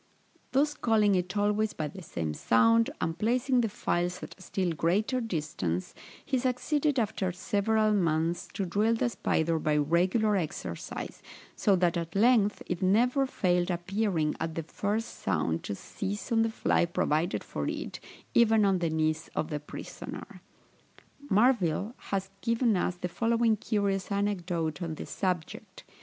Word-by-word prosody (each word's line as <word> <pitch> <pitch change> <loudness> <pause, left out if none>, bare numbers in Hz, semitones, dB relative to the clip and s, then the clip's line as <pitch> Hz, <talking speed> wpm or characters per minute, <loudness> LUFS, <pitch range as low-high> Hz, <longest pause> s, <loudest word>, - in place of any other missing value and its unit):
Thus 290 +3 +2
calling 215 -6 +3
it 185 +2 -1
always 210 +1 +1
by 155 - -3
the 185 +6 -9
same 80 - -4
sound, 115 +5 +4
and 165 0 -1
placing 250 +3 +2
the 225 - 0
flies 180 -1 -1
at - - -7
a - - -19
still 185 -1 -1
greater 200 - +1
distance, 150 - -3 0.3
he 260 - +1
succeeded, 275 +3 0
after 210 -5 0
several 215 +4 +1
months, 165 -3 +1
to 195 - -1
drill 210 +6 +2
the 240 - +1
spider 165 -7 0
by 150 -1 +1
regular 180 +8 +2
exercise, 170 -2 -5 0.3
so 200 -3 +3
that 175 -1 +2
at 170 +1 -4
length 210 -1 +3
it 180 - -3
never 245 +8 +3
failed 180 -6 +1
appearing 175 -3 0
at 160 -1 -3
the 165 - -2
first 210 +8 -3
sound 80 -2 0
to 100 - -3
seize 200 - -5
on 225 -1 +4
the 225 - +2
fly 220 - +2
provided 170 0 0
for - - -4
it, - - -5 0.3
even 225 -2 +5
on 195 -2 +3
the 170 -2 0
knees 155 0 0
of 155 - -2
the 150 - -1
prisoner. 150 - -9 0.9
Marville 210 -2 +2 0.2
has 195 -1 -2
given 230 -1 +2
us 180 0 0
the 180 0 -4
following 230 +3 +2
curious 200 -2 -1
anecdote 180 -5 -1
on 165 -2 -3
this - - -8
subject. 180 -4 -3
190 Hz, 155 wpm, -29 LUFS, 165-220 Hz, 0.9 s, even